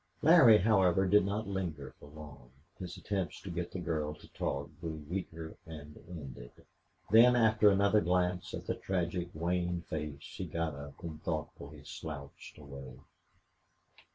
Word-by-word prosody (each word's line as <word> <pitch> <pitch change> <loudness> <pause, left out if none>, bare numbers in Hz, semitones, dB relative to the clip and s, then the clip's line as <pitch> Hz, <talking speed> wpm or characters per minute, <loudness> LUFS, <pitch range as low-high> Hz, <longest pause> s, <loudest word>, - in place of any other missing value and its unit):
Larry, 145 -9 +8
however, 95 -3 +4
did 100 +1 +5
not 105 +2 -2
linger 85 -9 -4
for - - -13
long. 75 -5 -12 0.3
His 90 -2 -6
attempts 95 -4 -3
to 95 - -7
get 85 0 -3
the - - -5
girl 80 -3 -2
to - - -16
talk 70 +2 -3
grew 80 -3 -5
weaker 80 -2 -5
and 75 -2 -9
ended; 65 -8 -9 0.6
then, 120 +3 +8
after 110 -2 +5
another 100 +2 +4
glance 90 0 0
at - - -7
the - - 0
tragic, 90 -1 -2
wan 85 +1 -1
face 75 -2 -4
he - - -4
got 85 -2 -2
up 70 +4 -10
and 80 -2 -6
thoughtfully 75 -2 -5
slouched 75 -2 -8
away. 70 -3 -10
85 Hz, 150 wpm, -32 LUFS, 75-95 Hz, 0.6 s, Larry